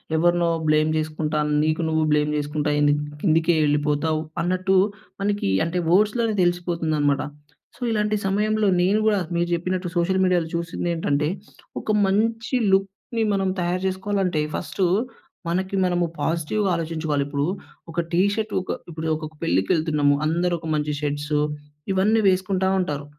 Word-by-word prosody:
ఎవరినో 175 +1 +3 0.2
బ్లేమ్ 155 +1 +3
చేసుకుంటా, 155 0 -2 0.2
నీకు 155 +2 0
నువ్వు 160 0 +1
బ్లేమ్ 150 0 +2
చేసుకుంటా 150 0 -1
ఏంది 145 0 +4 0.3
కిందికే 165 -1 +3
వెళ్ళిపోతావు. 150 +2 +1 0.2
అన్నట్టు 185 +2 +1 0.5
మనకి, 205 - 0 0.2
అంటే 170 +2 -1
వర్డ్స్‌లోనే 210 +4 +2
తెలిసిపోతుందనమాట. 165 -5 0 0.5
సో, - - -22
ఇలాంటి 210 -1 +1
సమయంలో 210 +2 +1
నేను 200 +4 +3
కూడా 205 -2 +3 0.2
నువు 170 0 +1
చెప్పినట్టు 180 +1 -1
సోషల్ 190 +2 +2
మీడియాలో 175 -3 +1
చూసింది 170 +1 -3
ఏంటంటే, 150 -2 0 0.5
ఒక - - -9 0.2
మంచి 225 +5 0 0.2
లుక్‌ని 195 +4 0
మనం 195 -1 +1
తయారు 175 +1 -1
చేసుకోవాలంటే 190 -3 -1
ఫస్టు 190 - -1 0.6
మనకి 190 +3 -1
మనము 175 -1 +1 0.2
పాజిటివ్‌గా 170 +5 0
ఆలోచించుకోవాలి. 160 -3 -1
ఇప్పుడు 145 0 -1 0.5
ఒక 170 - -3
టీ 175 - +4
షర్టు, 220 -1 -3
ఒక - - -5 0.2
ఇప్పుడు 160 -1 -5
ఒక 155 - -6 0.2
పెళ్ళికెళ్తున్నము, 145 - +2
అందరూ 175 +3 +1
ఒక 160 - -8
మంచి 150 0 -1
షర్ట్స్ 145 +1 -2 0.6
ఇవన్నీ 205 +4 +3
వేసుకుంటా 190 0 +1
ఉంటారు. 150 -5 -2
170 Hz, 135 wpm, -23 LUFS, 155-190 Hz, 0.6 s, ఏంది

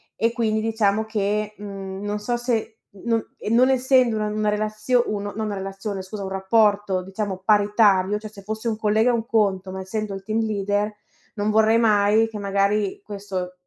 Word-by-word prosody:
e 230 +1 +1
quindi 220 -2 0
diciamo 220 -1 +1
che, 210 0 -1
mhmm, 195 -1 -7
non 205 0 -2
so 240 +3 -1
se, 235 -2 -2 0.3
non 230 -1 +1 0.2
e - - -5
non 245 +3 +4
essendo 255 -2 +3
una 215 - -1
una 210 0 0
relazione 215 +3 +1
uno, 205 -1 -3
no - - -9
non 220 0 -2
una 205 - -3
relazione 195 +1 -5
scusa, 200 +2 -7
un 190 - -4
rapporto 200 0 +2
diciamo 190 0 -4
paritario, 205 -1 +3
cioè 215 0 -8
se 205 -1 -13
fosse 220 +3 -4
un 220 - -1
collega 220 +2 +2
è - - +3
un 230 -1 -1
conto, 195 -5 +1
ma 190 - -6
essendo 210 +2 -4
il 195 - -6
team 220 +2 -1
leader, 205 -1 -1 0.4
non 210 -1 -1
vorrei 220 +1 +4
mai 215 0 +3
che 220 - -7
magari 200 0 0
questo 195 -3 -5
210 Hz, 195 wpm, -23 LUFS, 200-220 Hz, 0.4 s, non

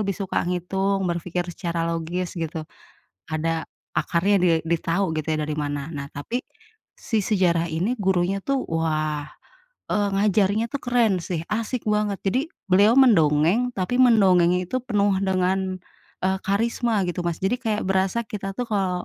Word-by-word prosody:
lebih 200 -2 -1
suka 195 -2 -1
ngitung, 190 +2 -1
berpikir 175 0 -2
secara 170 -2 -2
logis 170 +2 -2
gitu. 165 -2 -4 0.6
Ada 160 +1 -2 0.3
akarnya 195 +4 +2
di 180 -1 +3 0.2
ditahu 170 +2 0
gitu 155 - -3
ya 155 - -1
dari 150 0 -2
mana. 145 0 -3
Nah, 140 -3 -5
tapi 145 - -3 0.6
si 225 - -1
sejarah 175 -5 +2
ini 185 +9 0
gurunya 190 -1 +1
tuh, 275 -1 +1
wah, 155 -2 -1 0.7
eee, 205 -1 +1
ngajarnya 205 +1 +2
itu 280 - -1
keren 235 -6 +2
sih, 170 -1 -3
asyik 230 +2 -2
banget. 210 -1 +1
Jadi 200 +7 +2 0.3
beliau 205 +5 +6
mendongeng, 180 - +4
tapi 190 +6 -1
mendongengnya 185 -7 +5
itu 255 - -1
penuh 205 -4 +2
dengan, 190 0 0 0.5
eee, 190 0 +1
karisma 225 +1 +1
gitu, 175 0 -3
Mas. 170 -1 -1
Jadi 195 +6 +1
kayak 220 -4 -1
berasa 195 +4 +1
kita 205 -4 -5
tuh 245 - -1
kalau 185 -4 -1
190 Hz, 150 wpm, -24 LUFS, 170-210 Hz, 0.7 s, beliau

